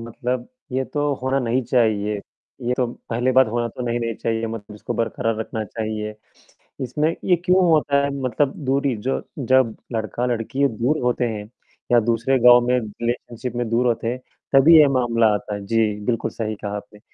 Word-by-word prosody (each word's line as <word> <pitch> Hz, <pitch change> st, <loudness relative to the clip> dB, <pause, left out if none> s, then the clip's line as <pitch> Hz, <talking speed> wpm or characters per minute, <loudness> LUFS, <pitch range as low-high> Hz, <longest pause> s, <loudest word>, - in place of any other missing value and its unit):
मतलब, 120 Hz, +2 st, -4 dB, 0.3 s
ये 130 Hz, +1 st, 0 dB
तो 145 Hz, +1 st, -1 dB
होना 130 Hz, +1 st, +1 dB
नहीं 125 Hz, +1 st, 0 dB
चाहिए। 110 Hz, -4 st, +1 dB, 0.5 s
ये 120 Hz, +1 st, 0 dB
तो 125 Hz, -, +1 dB, 0.2 s
पहली 120 Hz, +3 st, +1 dB
बात 130 Hz, -1 st, +6 dB
होना 120 Hz, +1 st, 0 dB
तो 125 Hz, -, -7 dB
नहीं 120 Hz, 0 st, 0 dB
नहीं 115 Hz, -1 st, -2 dB
चाहिए 115 Hz, +1 st, -2 dB
मतलब 110 Hz, -2 st, -7 dB
इसको 105 Hz, -, -5 dB
बरकरार 115 Hz, -1 st, -1 dB
रखना 110 Hz, 0 st, -4 dB
चाहिए। 110 Hz, 0 st, -4 dB, 0.7 s
इसमें 150 Hz, +5 st, 0 dB, 0.2 s
ये 180 Hz, -, +5 dB
क्यों 185 Hz, +1 st, +4 dB
होता 150 Hz, -3 st, +3 dB
है 140 Hz, -, 0 dB
मतलब 130 Hz, +2 st, 0 dB
दूरी 135 Hz, -1 st, +1 dB
जो 135 Hz, -, +1 dB, 0.2 s
जब 130 Hz, -3 st, +3 dB, 0.2 s
लड़का-लड़की 120 Hz, +5 st, -1 dB
दूर 125 Hz, +6 st, -1 dB
होते 125 Hz, 0 st, +1 dB
हैं 105 Hz, -2 st, -4 dB, 0.5 s
या 120 Hz, -, +7 dB
दूसरे 115 Hz, +3 st, +1 dB
गाँव 120 Hz, 0 st, +8 dB
में 125 Hz, -, +3 dB
रिलेशनशिप 120 Hz, +2 st, -4 dB
में 120 Hz, -1 st, -1 dB
दूर 120 Hz, +2 st, +2 dB
होते 115 Hz, -1 st, 0 dB
हैं, 125 Hz, +2 st, -2 dB, 0.3 s
तभी 145 Hz, +5 st, +8 dB
ये 150 Hz, -2 st, +8 dB
मामला 120 Hz, -4 st, +2 dB
आता 105 Hz, 0 st, -3 dB
है। 100 Hz, -1 st, -7 dB
जी, 110 Hz, -1 st, +1 dB
बिल्कुल 115 Hz, -1 st, -1 dB
सही 110 Hz, -1 st, -3 dB
कहा 100 Hz, 0 st, -3 dB
आपने। 105 Hz, 0 st, -9 dB
120 Hz, 180 wpm, -22 LUFS, 110-130 Hz, 0.7 s, गाँव